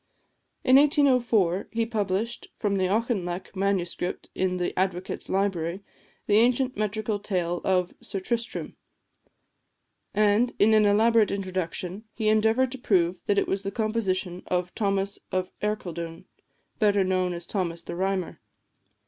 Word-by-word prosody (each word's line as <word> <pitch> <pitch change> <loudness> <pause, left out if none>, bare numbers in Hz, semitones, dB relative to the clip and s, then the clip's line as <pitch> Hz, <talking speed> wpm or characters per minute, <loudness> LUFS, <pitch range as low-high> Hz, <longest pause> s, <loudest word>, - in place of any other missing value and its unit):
In 255 +1 +6
1804 250 - +3
he 230 0 +1
published, 220 0 -2
from 200 -2 0
the 185 -1 +2
Auchinleck 195 -4 -1
Manuscript 185 -2 -2
in 185 -1 0
the 180 - -1
Advocates' 185 -1 -2
Library, 190 -2 -1 0.4
the 205 - +4
ancient 250 +3 +3
metrical 215 0 -1
tale 175 -4 -2
of 180 -2 +1
"Sir 195 - -4
Tristrem;" 230 +4 -3 1.4
and, 215 +3 +3
in 220 +2 +5
an 215 -1 +5
elaborate 220 +1 +4
introduction, 185 +1 -3
he 215 -2 +1
endeavoured 220 +4 +3
to 265 - -7
prove 185 -6 +2
that 200 - +2
it - - +2
was 195 - 0
the 195 - -3
composition 195 -4 -1
of 180 0 -1
Thomas 200 -2 -1
of 185 0 -1
Ercildoune, 170 -6 -4 0.5
better 205 -3 +3
known 185 -1 +1
as 170 0 -6
Thomas 170 -4 -2
the - - -6
Rhymer. 190 0 -2
200 Hz, 135 wpm, -26 LUFS, 185-220 Hz, 1.4 s, In